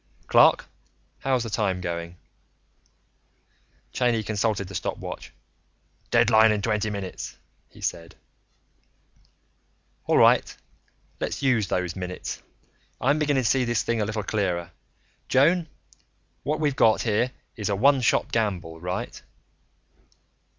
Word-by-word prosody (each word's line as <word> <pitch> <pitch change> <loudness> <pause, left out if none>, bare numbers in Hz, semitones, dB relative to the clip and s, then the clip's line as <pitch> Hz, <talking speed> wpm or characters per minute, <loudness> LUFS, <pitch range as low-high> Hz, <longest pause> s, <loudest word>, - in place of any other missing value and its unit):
"Clark, - - +5 0.5
how's 130 -3 0
the 115 - -5
time 100 -4 0
going?" 85 -1 -5 1.8
Cheyney 120 -3 +1
consulted 105 -2 -1
the 95 - -10
stopwatch. - - -5 0.8
"Deadline 110 0 +5
in 105 -1 -1
twenty 110 -1 0
nine 100 -2 -4
minutes," 95 - -7 0.3
he - - -17
said. 85 0 -4 1.9
"All - - +3
right, - - +4 0.6
let's - - -3
use 120 -7 +2
those 90 -2 -2
minutes. 90 -1 -5 0.6
I'm 140 +4 +2
beginning 145 -3 +1
to 115 - +2
see 135 -1 +2
this 120 -2 0
thing 115 -1 -1
a - - +1
little 105 0 -3
clearer. 90 -5 -1 0.6
Joan, 165 +6 +3 0.7
what 155 +1 -2
we've 145 -3 0
got 115 -6 +4
here 115 +2 +1 0.3
is 105 -3 -3
a 100 - +1
one 135 +6 +4
shot 110 - +1
gamble; 90 -8 -2
right?" 90 +1 -4
110 Hz, 120 wpm, -25 LUFS, 95-125 Hz, 1.9 s, Clark